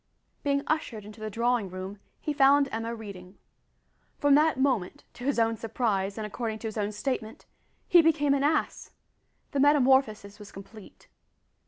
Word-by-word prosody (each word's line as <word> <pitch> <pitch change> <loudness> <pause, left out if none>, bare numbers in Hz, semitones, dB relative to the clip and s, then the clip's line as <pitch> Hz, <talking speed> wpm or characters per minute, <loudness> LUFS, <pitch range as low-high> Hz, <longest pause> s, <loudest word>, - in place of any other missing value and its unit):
Being 280 0 0
ushered 250 -9 -2
into 215 +1 -12
the 215 - -4
drawing 235 -1 0
room 185 +2 -7 0.2
he 300 - -3
found 280 0 +5
Emma 225 +1 -3
reading. 200 -4 -10 0.8
From 290 -1 +3
that 300 -1 +3
moment 255 -9 0
to 245 - -9
his 280 -2 0
own 225 -1 +1
surprise, 205 -3 -2
and 215 - -4
according 220 +1 -4
to 225 - -6
his 215 - -6
own 210 -1 -2
statement 220 +1 -4 0.4
he 350 - +7
became 300 -3 +2
an 280 - +1
ass! 300 +1 -1 0.6
The 280 - -1
metamorphosis 265 -7 +3
was 205 -1 -12
complete. 200 +2 -13
230 Hz, 160 wpm, -27 LUFS, 210-280 Hz, 0.8 s, he